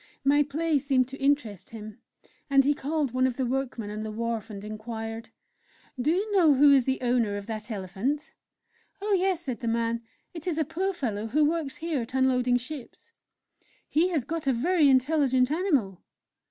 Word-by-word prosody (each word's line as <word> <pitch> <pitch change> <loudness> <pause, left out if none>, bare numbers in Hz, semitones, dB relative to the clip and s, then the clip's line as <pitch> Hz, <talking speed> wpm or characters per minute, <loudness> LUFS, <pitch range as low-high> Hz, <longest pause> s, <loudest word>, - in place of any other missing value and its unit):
My 285 +2 +4
play 300 +1 +1
seemed 260 -2 +2
to 270 +1 -9
interest 265 -9 0
him, 215 -2 -9 0.5
and 275 -1 +5
he 290 - +4
called 290 -1 -1
one 255 0 +3
of 250 - -4
the 260 - 0
workmen 245 -4 -3
on 215 +1 -5
the 220 - -4
wharf, 230 0 -3
and 200 -2 -8
inquired: 225 +1 -6 0.7
"Do 275 - +1
you 400 +5 0
know 325 -7 +6
who 285 +1 +7
is 265 -3 +4
the 265 0 0
owner 240 -5 +1
of 200 - -7
that 220 0 -6
elephant?" 210 +8 -3 0.7
"Oh, 410 +1 -1
yes," 375 -2 +1
said 255 -7 -4
the 240 - -4
man, 230 0 0 0.3
"it 330 0 -8
is 335 -3 -1
a 315 - +1
poor 365 +6 -1
fellow 225 - -3
who 295 +7 +3
works 310 -3 -1
here 320 -5 -2
at 230 +3 -7
unloading 250 -1 +3
ships." 255 +1 -9 0.8
"He 325 +4 +2
has 315 -8 0
got 320 +2 -4
a 265 - +4
very 305 +4 +3
intelligent 260 -1 +3
animal!" 285 - 0
265 Hz, 185 wpm, -27 LUFS, 230-305 Hz, 0.8 s, who